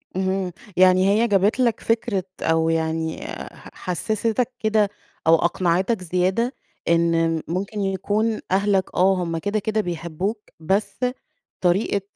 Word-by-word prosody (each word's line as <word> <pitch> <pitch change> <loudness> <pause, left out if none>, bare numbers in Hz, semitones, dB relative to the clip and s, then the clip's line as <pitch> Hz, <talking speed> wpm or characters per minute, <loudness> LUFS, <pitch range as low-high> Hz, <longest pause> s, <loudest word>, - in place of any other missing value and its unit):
اهم 190 -1 -1 0.3
يعني 185 +1 +5
هي 220 +4 +3
جابت 205 +3 +2
لك 235 -3 +2
فكرة 225 -4 0 0.2
أو 160 0 +2
يعني 160 0 -1
ح - - -9
حسِّستَك 220 +6 -1
كده 215 -2 +2 0.4
أو 165 - +8
أقنعتك 185 +5 +1
زيادة، 185 +8 0 0.3
إن 165 -1 +2
ممكن 195 +5 -3
يكون 205 +3 0
أهلك، 195 0 +1
آه، 190 +2 +4
هُم 165 -1 -2
كده، 205 +5 -1
كده 215 +1 0
بيحبُّوك، 175 +4 -3 0.2
بس 195 +9 -1 0.6
طريقة 195 +3 +2
190 Hz, 125 wpm, -23 LUFS, 170-210 Hz, 0.6 s, أو